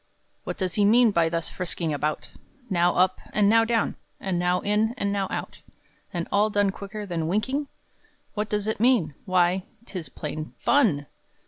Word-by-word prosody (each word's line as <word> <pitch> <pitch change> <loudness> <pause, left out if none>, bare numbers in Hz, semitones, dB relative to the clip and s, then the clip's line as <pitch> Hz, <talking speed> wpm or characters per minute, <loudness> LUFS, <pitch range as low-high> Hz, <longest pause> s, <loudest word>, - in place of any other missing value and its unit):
What - - -4
does 185 -3 -2
he 205 - +2
mean 230 +2 +5
by 170 -4 +2
thus 165 0 -2
frisking 170 -3 -3
about, 150 +2 -2 0.4
Now 175 -1 +3
up 185 +1 +2
and 210 -1 +4
now 225 +2 +5
down, 225 -1 0 0.2
and 185 -3 -1
now 180 +1 +1
in 215 +3 +1
and 200 -5 0
now 195 -1 0
out, - - -5 0.5
And 170 -2 -3
all 205 +2 +3
done 205 -1 +2
quicker 205 +2 -7
than 170 -4 -2
winking? 260 - -1 0.7
What 210 0 -2
does 210 -1 -1
it 220 -1 -2
mean? 225 - +3
Why, 185 -1 +2 0.2
'tis 175 - -6
plain 155 +3 -6
fun! 190 - +3
195 Hz, 175 wpm, -25 LUFS, 175-215 Hz, 0.7 s, mean